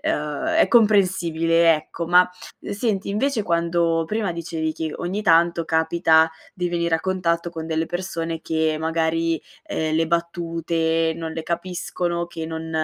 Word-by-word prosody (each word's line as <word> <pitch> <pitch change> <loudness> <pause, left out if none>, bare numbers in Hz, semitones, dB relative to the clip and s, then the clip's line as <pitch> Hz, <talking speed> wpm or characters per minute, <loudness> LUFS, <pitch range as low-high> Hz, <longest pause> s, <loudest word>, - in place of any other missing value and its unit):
ehm, 150 - -2 0.2
è - - +3
comprensibile, 170 - +4
ecco. 165 +2 -5
Ma, 180 +1 +6 0.5
senti, 200 -2 -1
invece, 225 +2 0
quando 170 -1 +1
prima 210 -3 -1
dicevi 165 -1 -3
che, 160 -1 -4
ogni 190 +4 -3
tanto, 170 -3 +3
capita 160 0 +3 0.2
di 180 -1 -2
venire 170 -1 0
a 160 - 0
contatto 170 -2 -1
con 160 -1 -6
delle 160 0 0
persone 165 -2 -4
che, 160 -1 0
magari, 165 0 0 0.3
ehm, 155 0 -2
le 165 0 +2
battute 165 -1 0
non 160 -1 -5
le 160 0 -4
capiscono, 175 0 -3
che 165 -2 -6
non 160 0 -6
165 Hz, 145 wpm, -22 LUFS, 160-175 Hz, 0.5 s, Ma